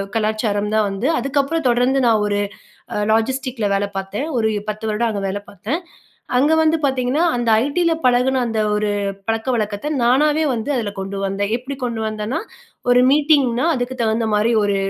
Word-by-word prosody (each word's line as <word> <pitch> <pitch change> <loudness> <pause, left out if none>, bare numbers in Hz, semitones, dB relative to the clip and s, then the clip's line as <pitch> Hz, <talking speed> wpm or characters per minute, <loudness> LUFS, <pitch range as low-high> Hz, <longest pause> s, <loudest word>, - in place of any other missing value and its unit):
கலாச்சாரம் 215 -1 0
தான் 215 -1 +3
வந்து, 195 +6 -2
அதுக்கப்புறம் 280 +4 0
தொடர்ந்து 250 +2 +2
நான் 225 -3 +3
ஒரு 205 0 0 0.6
அ - - -1
லாஜிஸ்டிக்ல 250 +1 0
வேல 200 +1 +1
பார்த்தேன், 195 +7 -3
ஒரு 220 -2 +2 0.2
10 215 +1 -4
வருடம் 220 +2 0
அங்க 205 -2 -3
வேல 195 +1 -3
பார்த்தேன். 215 - -3 0.6
அங்க 290 +5 +3
வந்து 315 +1 +3
பார்த்தீங்கன்னா, 265 +4 +1
அந்த 240 -1 -1 0.2
ஐடியில 335 +3 +1
பழகுன 250 +1 +3
அந்த 225 -1 -1 0.2
ஒரு 210 0 0 0.4
பழக்கவழக்கத்த 225 +2 -1
நானாகவே 295 +6 +3
வந்து, 235 +5 -2
அதுல 215 -4 -2
கொண்டு 195 +1 -5
வந்தேன். 200 +2 -2
எப்டி 270 +3 -7
கொண்டு 230 -2 -2
வந்தன்னா, 215 +3 -3 0.5
ஒரு 245 0 +6
மீட்டிங்னா 285 -3 +3
அதுக்கு 245 +1 -3
தகுந்த 225 0 +1
மாரி 210 +2 +2
ஒரு 200 -1 +1
235 Hz, 160 wpm, -20 LUFS, 210-265 Hz, 0.6 s, ஒரு